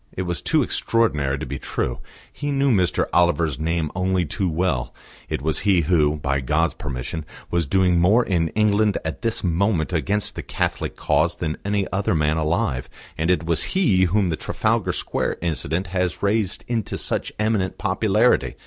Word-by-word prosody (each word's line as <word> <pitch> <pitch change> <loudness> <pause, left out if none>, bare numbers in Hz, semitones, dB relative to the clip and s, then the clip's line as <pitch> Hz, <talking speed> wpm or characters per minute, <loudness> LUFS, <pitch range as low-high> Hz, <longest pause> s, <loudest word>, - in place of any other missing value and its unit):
It 95 - -3
was 90 -3 -3
too - - +2
extraordinary 75 -13 +1
to - - -5
be - - -5
true. - - -3 0.3
He 145 - -4
knew 140 -1 +2
Mr. 90 -5 +2
Oliver 85 -1 +3
Brand's 75 -5 -2
name 80 -1 -1
only 90 0 +1
too 95 +4 -1
well; 80 -6 -1 0.3
it 65 - -3
was 80 -1 0
he 95 -4 +3
who, 75 -2 +2
by 70 -2 -1
God's 75 +6 +1
permission, 75 0 -5 0.3
was 85 -3 +1
doing 90 +1 +3
more 105 +8 +4
in 85 -4 +1
England 105 -1 +3
at 80 - -4
this 115 -1 -2
moment 90 -1 +1
against 100 +5 0
the - - -5
Catholic - - -2
cause 85 +2 +1
than 80 -3 -3
any 100 -1 0
other 95 -2 +1
man 75 0 +1
alive; 75 -5 -1 0.3
and 80 +2 -1
it 90 -3 +2
was 85 -1 0 0.2
he 95 - +4
whom 95 +1 +1
the 80 - -1
Trafalgar - - 0
Square - - -2
incident 85 +1 -2
had 90 -1 0
raised 100 -1 0
into 115 -4 -2
such - - -1
eminent 105 -3 0
popularity. - - +2
90 Hz, 175 wpm, -22 LUFS, 80-100 Hz, 0.3 s, more